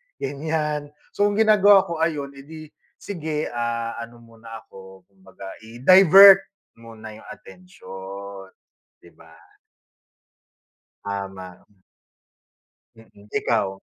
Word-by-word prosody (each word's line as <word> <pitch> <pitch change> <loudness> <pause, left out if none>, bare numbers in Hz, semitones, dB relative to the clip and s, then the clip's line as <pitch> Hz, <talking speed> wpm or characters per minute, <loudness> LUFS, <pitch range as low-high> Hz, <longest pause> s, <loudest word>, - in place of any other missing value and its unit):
ganiyan. 150 +1 -4 0.2
So, 205 - 0
ginagawa 205 -2 +4
ko, 170 -3 -7
ayun, 150 -4 -2
edi 155 +3 -13 0.2
sige, 155 -5 -6
ah, 115 -1 -4
ano 120 0 -11
muna 115 -1 -13
ako, 95 -1 -16
kumbaga 95 0 -18 0.2
i-divert 185 - +6 0.4
muna 110 -1 -12
yung - - -17
atensiyon. 100 - -12 0.6
Di 85 - -18
ba? 80 0 -21 1.7
Tama. 95 -2 -8 1.3
Mm, 110 -2 -20
ikaw? 95 -4 -1
120 Hz, 90 wpm, -22 LUFS, 100-160 Hz, 1.7 s, i-divert